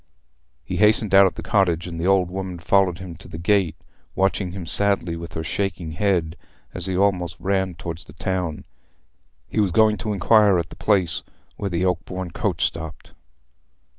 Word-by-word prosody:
He - - -4
hastened 105 0 +3
out 95 0 +8
of - - -4
the - - -7
cottage, 90 -5 +1
and 85 -2 -6
the 90 - 0
old 95 -2 +3
woman 95 -1 -4
followed 90 +1 +2
him 90 -1 -8
to - - -10
the - - -8
gate, 90 0 +2 0.4
watching 95 -1 +1
him 95 -2 -6
sadly 100 -2 +1
with 85 0 -8
her 80 - -3
shaking 90 -1 -3
head 85 -2 0 0.4
as - - -4
he 95 -1 -1
almost 90 -4 +1
ran 95 -2 0
towards 85 -1 -6
the 75 - -12
town. 90 -3 -3 0.8
He - - -2
was 100 -2 +3
going 110 +3 +4
to 100 +4 -3
inquire 105 0 +4
at 85 -1 -3
the - - -9
place 90 -6 +1 0.3
where 100 - -3
the 90 0 0
Oakbourne 90 0 -2
coach - - 0
stopped. 80 -2 -6
90 Hz, 180 wpm, -23 LUFS, 85-100 Hz, 0.8 s, out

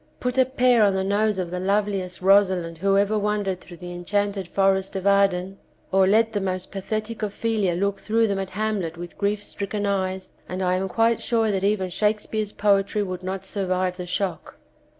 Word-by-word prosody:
Put 250 +1 -1
a 260 - +6
pair 250 -2 +3
on 200 -2 +4
the 190 - 0
nose 205 +1 +1
of 180 -2 -3
the 180 - -3
loveliest 195 -1 -1
Rosalind 185 -4 +3
who 195 +2 +2
ever 205 +2 +2
wandered 205 -3 -1
through 175 - -12
the 175 0 -8
enchanted 195 +2 -2
forest 195 +1 +1
of 190 0 -3
Arden, 195 -1 +2 0.3
or 190 0 +4
let 220 +3 +3
the 205 - 0
most 185 -1 -3
pathetic 215 +3 -4
Ophelia 210 -3 0
look 200 +2 -1
through 225 +1 +1
them 200 -2 -1
at 190 -1 -4
Hamlet 205 -7 -1
with 175 0 -8
grief 205 0 -1
stricken 205 +1 -4
eyes, 190 -1 -1 0.2
and 185 +1 -3
I 180 0 +2
am 190 +1 -1
quite 225 +2 +2
sure 225 -2 +1
that 195 -1 -1
even 200 -2 +1
Shakespeare's 210 +1 -1
poetry 200 0 +2
would 185 -2 -5
not 190 +1 -4
survive 185 -2 -1
the 180 -1 -6
shock. 180 -3 -3
195 Hz, 190 wpm, -24 LUFS, 185-210 Hz, 0.3 s, a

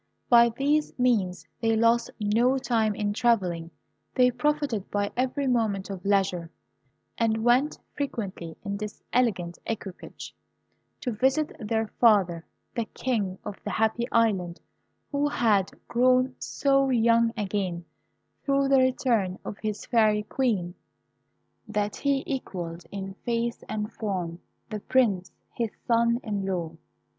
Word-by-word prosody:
By 235 0 +8
this 295 +2 +1
means 200 -10 +1
they 225 -1 +2
lost 230 +1 +3
no 230 +5 +3
time 230 -5 +1
in 205 0 -1
travelling. 185 -8 +1 0.5
They 250 -1 +5
profited 280 -6 -1
by 205 0 -1
every 260 +3 0
moment 220 -6 0
of 185 -2 -7
leisure, 190 -4 +1 0.7
and 225 -1 +1
went 250 +5 +3 0.2
frequently 195 - -4
in 200 -1 -3
this 210 0 -7
elegant 185 -9 +1
equipage 200 -4 -6 0.7
to 250 - -2
visit 265 +7 +1
their 220 0 0
father, 190 -8 +4 0.3
the 235 - -1
King 210 -7 -2
of 200 - -6
the - - -3
Happy 220 +3 +1
Island, 195 -7 +1 0.5
who 290 0 +1
had 210 -8 +2 0.2
grown 255 +2 +3
so 275 -1 +2
young 230 -1 +4
again 190 -4 -2 0.6
through 275 -1 +2
the 270 -1 +6
return 240 -7 +1
of 200 - -6
his 215 -1 -4
Fairy 215 -3 +3
Queen, 210 -7 -1 0.9
that 210 -1 -1
he 280 -1 +1
equalled 175 -10 -5
in 195 -1 -5
face 235 -1 -1
and 215 +1 -3
form 180 -6 -3 0.3
the 215 - -3
Prince, 205 -7 +1 0.2
his 230 -2 -1 0.2
son 235 0 +3
in 205 -3 -2
law. 180 -4 -2
220 Hz, 130 wpm, -27 LUFS, 195-250 Hz, 0.9 s, By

